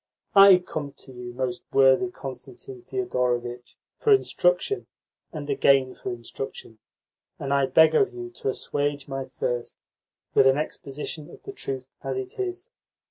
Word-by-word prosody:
I 195 Hz, -2 st, +9 dB
come 155 Hz, -5 st, -5 dB
to 140 Hz, -, -11 dB
you, 125 Hz, 0 st, -7 dB
most 125 Hz, -1 st, -3 dB
worthy 135 Hz, +7 st, +5 dB
Constantine 360 Hz, -, -9 dB
Thedorovitch, 125 Hz, -, -2 dB, 0.2 s
for 440 Hz, -, +2 dB
instruction, 460 Hz, +1 st, +2 dB, 0.4 s
and 150 Hz, -4 st, -6 dB
again 135 Hz, -2 st, +3 dB
for -, -, -6 dB
instruction, 120 Hz, -1 st, -7 dB, 0.6 s
and 140 Hz, -1 st, 0 dB
beg 160 Hz, +2 st, +6 dB
of 155 Hz, -, +3 dB
you 120 Hz, 0 st, -7 dB
to 125 Hz, -, -3 dB
assuage 145 Hz, +1 st, -2 dB
my 135 Hz, -1 st, -4 dB
thirst 120 Hz, -2 st, -3 dB, 0.6 s
with 135 Hz, -, +6 dB
an 135 Hz, +1 st, +4 dB
exposition 150 Hz, 0 st, -4 dB
of -, -, -14 dB
the 400 Hz, -, -7 dB
truth 130 Hz, -, -5 dB
as 135 Hz, -1 st, -2 dB
it 130 Hz, -, -6 dB
is. 370 Hz, +2 st, -3 dB
135 Hz, 140 wpm, -25 LUFS, 130-180 Hz, 0.6 s, I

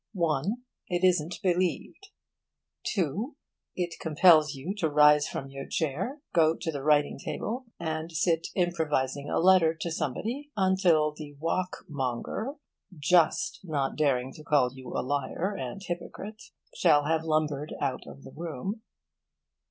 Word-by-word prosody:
(1) 175 Hz, -, 0 dB, 0.2 s
It 175 Hz, 0 st, -1 dB
isn't 175 Hz, -1 st, 0 dB
believed. 185 Hz, -, -1 dB, 0.8 s
(2) 205 Hz, -, -1 dB, 0.4 s
It 175 Hz, -2 st, -3 dB
compels 155 Hz, -2 st, +5 dB
you 145 Hz, +9 st, -4 dB
to 160 Hz, -, +1 dB
rise 150 Hz, 0 st, +6 dB
from 135 Hz, -, -5 dB
your 135 Hz, 0 st, -7 dB
chair, 185 Hz, -, -2 dB
go 160 Hz, -2 st, +4 dB
to 165 Hz, -, -2 dB
the 140 Hz, -3 st, -5 dB
writing 145 Hz, 0 st, +2 dB
table, 250 Hz, +4 st, -4 dB
and 160 Hz, 0 st, -3 dB
sit 165 Hz, +1 st, +1 dB
improvising 150 Hz, -6 st, 0 dB
a -, -, 0 dB
letter 175 Hz, -2 st, +5 dB
to 170 Hz, -, -3 dB
somebody 230 Hz, -, -3 dB
until 185 Hz, -5 st, +3 dB
the 150 Hz, -2 st, -9 dB
walkmonger 165 Hz, -, -3 dB, 0.4 s
(just 175 Hz, -, +3 dB
not 145 Hz, -6 st, -1 dB
daring 135 Hz, -4 st, +1 dB
to 155 Hz, -, -12 dB
call 145 Hz, -5 st, +2 dB
you 130 Hz, -1 st, -10 dB
liar 145 Hz, +8 st, -1 dB
and 155 Hz, +4 st, -5 dB
hypocrite) 195 Hz, +5 st, -6 dB, 0.3 s
shall 150 Hz, -4 st, +4 dB
have 160 Hz, +1 st, +1 dB
lumbered 155 Hz, -2 st, -1 dB
out -, -, -2 dB
of 70 Hz, -, -11 dB
the 70 Hz, -, -11 dB
room. 170 Hz, -, -5 dB
160 Hz, 135 wpm, -28 LUFS, 145-185 Hz, 0.8 s, rise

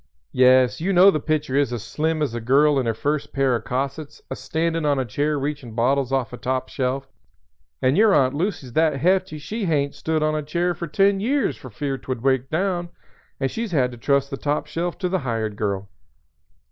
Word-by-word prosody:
"Yes, 130 Hz, +1 st, +4 dB
you 195 Hz, +4 st, 0 dB
know 185 Hz, +2 st, +7 dB
the 155 Hz, -, -1 dB
picture 150 Hz, -3 st, -1 dB
is 140 Hz, -3 st, +2 dB
as 120 Hz, -3 st, -4 dB
slim 155 Hz, 0 st, -1 dB
as 135 Hz, -, -2 dB
a 120 Hz, -, -4 dB
girl 140 Hz, +4 st, +4 dB
in 125 Hz, -, -1 dB
her 115 Hz, -, +1 dB
first 145 Hz, +5 st, -2 dB
pair 135 Hz, -2 st, +1 dB
o' 115 Hz, -, 0 dB
cossets 140 Hz, +5 st, -4 dB
a -, -, -2 dB
standin' 165 Hz, 0 st, -2 dB
on 145 Hz, -2 st, +2 dB
a 130 Hz, -, 0 dB
chair 145 Hz, +6 st, -1 dB
a -, -, -2 dB
reachin' 140 Hz, -5 st, -4 dB
bottles 130 Hz, +2 st, +1 dB
off 130 Hz, -3 st, -1 dB
a -, -, -6 dB
top 130 Hz, +1 st, -2 dB
shelf, 135 Hz, 0 st, -2 dB, 0.8 s
and 130 Hz, +2 st, +3 dB
your 215 Hz, +2 st, +5 dB
Aunt 130 Hz, -7 st, +3 dB
Lucy's 150 Hz, -, -3 dB
that 160 Hz, +1 st, +3 dB
hefty 185 Hz, +3 st, +1 dB
she 210 Hz, +8 st, -4 dB
hain't 145 Hz, -4 st, 0 dB
stood 160 Hz, -1 st, -1 dB
on 155 Hz, 0 st, +1 dB
a 155 Hz, -, -1 dB
chair 170 Hz, +4 st, -1 dB
for 170 Hz, +1 st, -6 dB
ten 195 Hz, +5 st, +2 dB
years 265 Hz, +7 st, 0 dB
for 130 Hz, -, -11 dB
fear 135 Hz, +4 st, -3 dB
'twould 130 Hz, -3 st, -5 dB
break 135 Hz, -1 st, +1 dB
down, 175 Hz, +1 st, -1 dB, 0.5 s
and 135 Hz, -1 st, -1 dB
she's 225 Hz, -4 st, -4 dB
had 125 Hz, -5 st, +2 dB
to 120 Hz, -, -10 dB
trust 140 Hz, +2 st, +1 dB
the 135 Hz, -, -3 dB
top 145 Hz, +1 st, -1 dB
shelf 165 Hz, +3 st, -3 dB
to 185 Hz, -, -1 dB
the 190 Hz, +1 st, 0 dB
hired 115 Hz, -6 st, -2 dB
girl. 100 Hz, -2 st, -2 dB
145 Hz, 220 wpm, -23 LUFS, 130-165 Hz, 0.8 s, know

